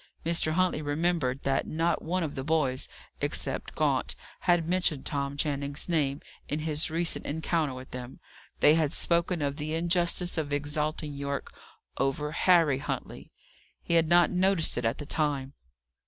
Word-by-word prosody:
Mr. 165 -1 +2
Huntley 185 -2 +1
remembered 145 -3 0
that 135 0 0
not 165 +2 0
one 180 +3 -1
of 150 -3 -3
the 135 - -4
boys, 145 -4 +1 0.3
except - - -3
Gaunt, - - +1 0.2
had 175 -2 +2
mentioned 175 -6 +1
Tom 140 -1 -2
Channing's 140 -1 -1
name 145 -5 +1 0.3
in 150 +2 -2
his 155 0 0
recent 165 +1 -1
encounter 155 -2 -1
with 130 0 -10
them; 125 0 -7 0.4
they 150 - +7
had 155 -3 +2
spoken 170 -1 +1
of 140 0 -1
the 155 +1 -3
injustice 175 +1 +1
of 150 -2 -3
exalting 150 +1 -2
Yorke 140 0 -4 0.5
over 135 +2 0
Harry 165 -5 +4
Huntley. - - -5 0.5
He - - -1
had 165 -1 +4
not 175 +1 +5
noticed 185 -2 +2
it 120 - -2
at 115 - +1
the 145 - -6
time. 140 -3 -1
155 Hz, 155 wpm, -28 LUFS, 140-170 Hz, 0.5 s, they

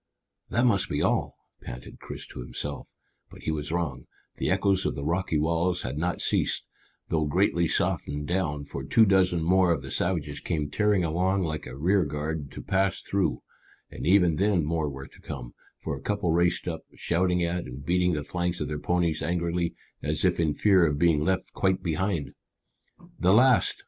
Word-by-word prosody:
"That 120 +5 +2
must 100 -6 +2
be - - 0
all," - - 0 0.2
panted 60 0 -9
Chris - - -8
to - - -9
himself; 70 +4 -5 0.4
but - - -14
he 80 - -1
was 75 -1 -3
wrong; 80 -8 -2 0.3
the - - -1
echoes 95 -1 +2
of - - -1
the 70 - -5
rocky 85 0 0
walls 85 +3 +1
had 65 +4 -4
not 85 +2 -1
ceased, - - +1 0.4
though 80 -2 +1
greatly 85 +1 +2
softened 75 -1 -1
down, 75 -5 -1
for 70 -1 -6
two 110 +11 +5
dozen 95 -4 +3
more 90 +1 +4
of 85 - 0
the - - -7
savages 75 -6 -1
came 75 -4 -2
tearing 105 -1 +2
along 90 +4 +1
like 80 -2 -3
a 65 - -8
rearguard 75 -3 0
to - - -8
pass 95 0 +1
through, 100 -1 -1 0.5
and - - -5
even 90 -4 +4
then 95 -5 +2
more 80 -1 0
were 65 -1 -7
to - - -17
come, - - -7 0.2
for - - -4
a - - -9
couple 105 -4 0
raced 85 +2 +2
up, 80 -2 -3
shouting 90 +1 +1
at 85 +1 -1
and 65 +3 -9
beating 90 +1 +2
the 75 -2 -2
flanks 90 +3 -2
of 75 - -2
their 75 -1 -3
ponies 85 -1 0
angrily, 85 0 -1 0.3
as - - 0
if - - +2
in 80 -3 +1
fear 95 -4 +4
of 75 -3 +2
being 80 -2 +3
left 95 +2 -1
quite 95 -1 +1
behind. 85 -1 -1 0.9
"The 90 +2 +4
last!" 125 +2 +4
85 Hz, 185 wpm, -27 LUFS, 75-95 Hz, 0.9 s, two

